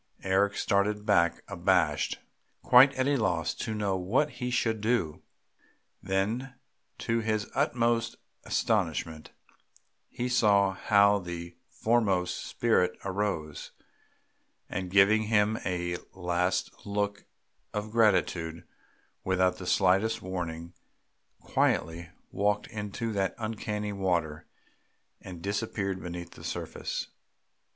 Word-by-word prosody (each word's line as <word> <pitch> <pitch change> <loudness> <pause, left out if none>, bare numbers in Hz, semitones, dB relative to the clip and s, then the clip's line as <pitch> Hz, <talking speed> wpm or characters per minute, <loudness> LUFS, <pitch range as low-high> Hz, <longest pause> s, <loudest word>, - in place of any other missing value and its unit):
Eric 100 +2 +2
started 105 +1 +1
back 85 -6 +2
abashed, - - +1 0.5
quite 130 +3 +8
at 130 +1 +1
a 145 0 +2
loss 90 -8 0
to 110 - -4
know 100 -2 0
what 115 +12 +1
he 125 -1 -4
should 115 -3 0
do; 105 -9 0 0.8
then 110 +8 -1 0.4
to 115 0 0
his 110 -2 -1
utmost 115 -1 +1 0.3
astonishment 80 -1 -1 0.8
he 125 - -3
saw 100 -6 +3
how 100 +1 +4
the 85 -1 -7
foremost 105 -6 +1
spirit 90 -6 +1
arose, 95 -6 -3 0.9
and, 95 -1 -4
giving 100 +3 +5
him 105 0 +2
a 85 -1 -1 0.2
last 90 0 0
look 100 0 -2 0.5
of 105 0 -4
gratitude, 90 -7 +2 0.6
without 95 -1 +2
the 90 - -7
slightest 95 +5 +3
warning 85 -2 -5 0.7
quietly 80 +2 0 0.2
walked 105 +1 +1
into 110 +1 -4
that 95 -2 -1
uncanny 105 -2 -3
water 85 -6 -1 0.7
and 90 -3 -9
disappeared 100 -2 -2
beneath 85 0 -6
the - - -13
surface! - - -4
100 Hz, 105 wpm, -29 LUFS, 90-110 Hz, 0.9 s, quite